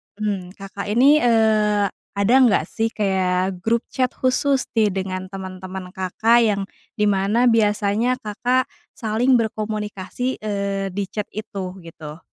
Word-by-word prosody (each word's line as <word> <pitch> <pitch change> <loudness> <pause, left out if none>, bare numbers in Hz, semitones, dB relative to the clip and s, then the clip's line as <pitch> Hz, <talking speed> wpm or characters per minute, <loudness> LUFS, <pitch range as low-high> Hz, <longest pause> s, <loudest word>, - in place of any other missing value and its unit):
Mmm, 200 -3 -4
Kakak 200 0 -7
ini, 265 +8 +5
eee, 215 -4 +3 0.2
ada 200 +4 +1
enggak 235 - +3
sih 225 0 -2
kayak 185 -3 0
grup 230 +2 0
chat 255 -2 -1
khusus 265 +1 +1
nih 215 -2 +3
dengan 185 0 -4
teman-teman 185 -1 -7
Kakak 225 +6 +3
yang 205 -3 +1 0.4
di 210 - +3
mana 205 +5 +2
biasanya 220 +2 +2
Kakak 250 +4 0 0.2
saling 240 +3 +2
berkomunikasi, 215 +2 -3
eee, 200 -2 -2
di 195 +1 -3
chat 210 +2 -3
itu, 200 -3 -5
gitu? 160 -2 -10
210 Hz, 130 wpm, -21 LUFS, 190-230 Hz, 0.4 s, ini